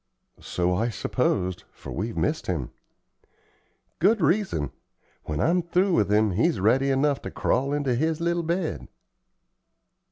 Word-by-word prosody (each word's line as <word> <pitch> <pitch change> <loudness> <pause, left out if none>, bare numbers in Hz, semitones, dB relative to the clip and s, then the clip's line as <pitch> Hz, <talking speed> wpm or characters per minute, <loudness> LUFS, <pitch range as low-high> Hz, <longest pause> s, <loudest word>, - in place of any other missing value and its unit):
"So 90 0 -1
I 110 +6 0
supposed, 90 -2 -1
for - - -10
we've 105 +7 -4
missed 155 +1 -1
him." 80 -9 -2 1.3
"Good 210 +5 +4
reason. 170 - +1 0.5
When 75 -1 -3
I'm 175 - +2
through 180 +3 +1
with 105 - +2
him 105 0 +3
he's 110 - +1
ready 130 +8 +3
enough 140 +1 +1
to - - -6
crawl 135 +2 0
into 145 -3 0
his 155 +6 0
little 170 +1 0
bed." 170 0 -2
135 Hz, 135 wpm, -25 LUFS, 100-170 Hz, 1.3 s, Good